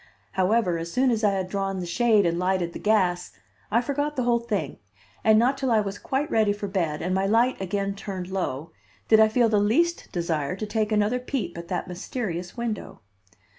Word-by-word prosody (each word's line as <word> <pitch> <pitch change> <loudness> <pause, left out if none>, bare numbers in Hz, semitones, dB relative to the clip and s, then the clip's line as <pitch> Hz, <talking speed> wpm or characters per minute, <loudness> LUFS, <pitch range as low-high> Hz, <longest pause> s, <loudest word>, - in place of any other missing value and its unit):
However, 185 -2 +1
as 165 +1 -5
soon 255 +3 +2
as 225 -1 -1
I 205 -1 +4
had 190 -1 -2
drawn 195 0 -2
the 180 - -4
shade 215 +2 +3
and 170 0 0
lighted 180 -2 0
the - - -6
gas, 185 -5 +1 0.4
I 230 +3 +3
forgot 290 +3 -2
the 255 - 0
whole 240 -1 +2
thing, 205 - -3 0.4
and 220 -1 +5
not 255 +4 +2
till 265 - 0
I 225 - +4
was 205 -1 -3
quite 285 +4 -2
ready 215 -2 +3
for 205 0 -5
bed, 170 -6 -2
and 180 +2 -1
my 190 +1 +1
light 230 +2 +2
again 195 +1 -1
turned 190 -2 -6
low, 165 -5 -3 0.4
did 220 - +7
I 220 - +7
feel 235 +2 +3
the 215 -2 +2
least 335 +12 +1
desire 170 -2 -1
to 215 - -4
take 215 0 -1
another 215 +3 +2
peep 245 -8 -3
at 170 0 -7
that 180 - -3
mysterious 180 0 -5
window. 230 - -4
205 Hz, 210 wpm, -25 LUFS, 180-230 Hz, 0.4 s, did